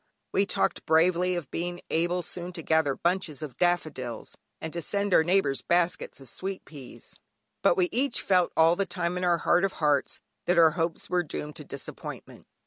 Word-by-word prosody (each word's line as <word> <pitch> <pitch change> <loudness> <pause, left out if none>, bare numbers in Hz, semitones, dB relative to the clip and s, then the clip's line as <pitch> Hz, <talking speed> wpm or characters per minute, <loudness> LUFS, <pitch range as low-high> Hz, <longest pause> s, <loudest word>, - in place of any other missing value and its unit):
We 195 +1 +2
talked - - -1
bravely 180 +3 +3
of 170 -6 -5
being 175 +1 -3
able 175 +2 +1
soon 175 +2 -6
to 165 - -6
gather 160 -4 +2
bunches 170 -5 -1
of 145 -5 -7
daffodils, 155 -10 -1 0.2
and 160 - -6
to 170 - -3
send 200 +4 -1
our 160 - +6
neighbours 175 -6 +2
baskets 175 -3 0
of 135 - -13
sweet 190 +6 -5
peas. 140 -5 -11 0.5
But 175 - +4
we 180 -1 +3
each 270 +4 0
felt 180 -2 +3
all 165 +1 +6
the 195 +1 -1
time 170 0 -2
in 180 - -3
our 175 -1 +3
heart 175 +2 +2
of 195 - +1
hearts, 150 -3 +1 0.3
that 180 - +2
our 165 -2 +7
hopes 165 0 -2
were 180 0 +1
doomed 150 -2 -6
to - - -7
disappointment. - - -8
175 Hz, 190 wpm, -27 LUFS, 160-180 Hz, 0.5 s, our